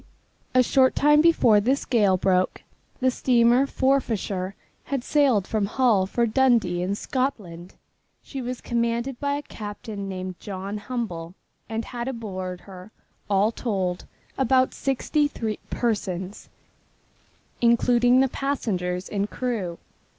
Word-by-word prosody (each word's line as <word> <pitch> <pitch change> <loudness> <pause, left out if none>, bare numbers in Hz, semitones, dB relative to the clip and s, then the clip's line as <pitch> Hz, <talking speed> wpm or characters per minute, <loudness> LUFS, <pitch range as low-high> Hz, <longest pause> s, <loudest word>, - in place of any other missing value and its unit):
A 255 - +6
short 260 +1 +3
time 295 +1 +5
before 275 -10 +5
this 265 +6 0
gale 205 -6 +3
broke, 185 0 +1 0.4
the 260 0 +3
steamer 245 +1 +3
Forfarshire 220 -9 0 0.3
had 275 -3 -2
sailed 265 -11 +3
from 215 -2 -1
Hull 220 -5 +2
for 235 +4 +1
Dundee 230 -7 +2
in 190 +3 -1
Scotland. 205 - -3 0.5
She 270 - -6
was 250 0 -5
commanded 235 +2 -1
by 285 -1 0
a 290 - -4
captain 205 -3 -7
named 185 -1 -6
John 200 +1 -5
Humble 190 -8 -5 0.3
and 225 0 -3
had 240 -1 -5
aboard 190 -7 -5 0.7
all 200 +2 +3
told 190 -7 -2 0.3
about 260 0 +3
sixty 290 +3 0
three 220 -7 -4
persons, 195 -5 -3 1.1
including 245 +1 +4
the 270 - +3
passengers 190 -10 -2
and 205 0 -2
crew. 215 -9 -3
230 Hz, 120 wpm, -24 LUFS, 195-255 Hz, 1.1 s, A